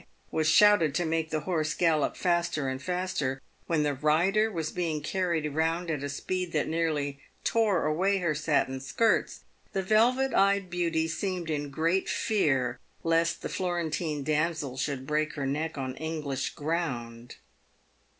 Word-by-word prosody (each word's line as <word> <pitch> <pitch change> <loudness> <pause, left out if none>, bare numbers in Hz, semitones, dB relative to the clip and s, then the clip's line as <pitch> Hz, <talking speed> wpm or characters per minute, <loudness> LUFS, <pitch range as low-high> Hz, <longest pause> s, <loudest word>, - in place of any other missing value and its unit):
was 155 -1 +1
shouted 170 -5 +5
to 175 - +1
make 160 0 -1
the 155 -1 -1
horse 155 -4 -1
gallop 160 -4 +2
faster 170 -5 0
and 130 0 -3
faster, 180 -7 -2 0.3
when 160 -3 +2
the 145 -1 +1
rider 175 +10 +2
was 165 -5 -3
being 165 -4 -1
carried 165 0 -1
round 165 +2 0
at 150 -3 -2
a 145 - -3
speed 180 +5 -3
that 155 -2 0
nearly 150 -4 -1 0.2
tore 215 -7 +2
away 185 +6 +2
her 170 -4 0
satin 145 -3 0
skirts, 225 +12 +1 0.3
the 195 - 0
velvet 245 +7 +3
eyed 195 -2 +3
beauty 165 -2 0
seemed 175 0 -3
in 145 -1 -2
great 165 +6 0
fear 135 - +1 0.2
lest 165 0 +1
the - - -1
Florentine 170 -4 -2
damsel 155 -2 0
should 130 0 -3
break 150 +2 0
her 140 - -2
neck 150 +3 -2
on 130 -1 -3
English 155 -3 -3
ground. 125 -7 -3
160 Hz, 150 wpm, -28 LUFS, 145-180 Hz, 0.3 s, shouted